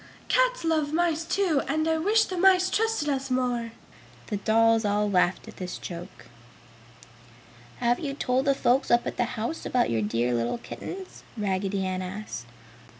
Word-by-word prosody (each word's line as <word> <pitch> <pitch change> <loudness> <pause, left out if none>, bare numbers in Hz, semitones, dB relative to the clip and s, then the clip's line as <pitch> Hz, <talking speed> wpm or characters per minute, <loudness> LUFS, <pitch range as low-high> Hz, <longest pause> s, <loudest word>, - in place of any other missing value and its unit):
"Cats - - +2
love 315 -3 +1
mice, 330 -1 +1
too, 335 -4 +1
and 315 0 0
I 320 0 +1
wish 425 +6 +3
the 370 - -5
mice 370 0 +4
trusted 445 -8 +1
us 270 -1 -1
more!" 245 -2 -1 0.6
The 205 - 0
dolls 225 +2 +3
all 210 0 +1
laughed 185 -2 +1
at - - -11
this 180 -1 -5
joke. 175 +2 -9 1.5
"Have 240 +1 +1
you 280 -3 -4
told 255 -1 0
the 275 -1 +3
folks 260 +1 +2
up 240 0 +3
at - - -4
the 245 - +2
house 235 +9 -3
about 245 - +1
your 115 -1 +1
dear 115 +4 0
little 120 - 0
kittens?" 375 +9 -8 0.2
Raggedy 195 -1 -1
Ann 185 0 -2
asked. 185 - -6
245 Hz, 165 wpm, -26 LUFS, 200-320 Hz, 1.5 s, mice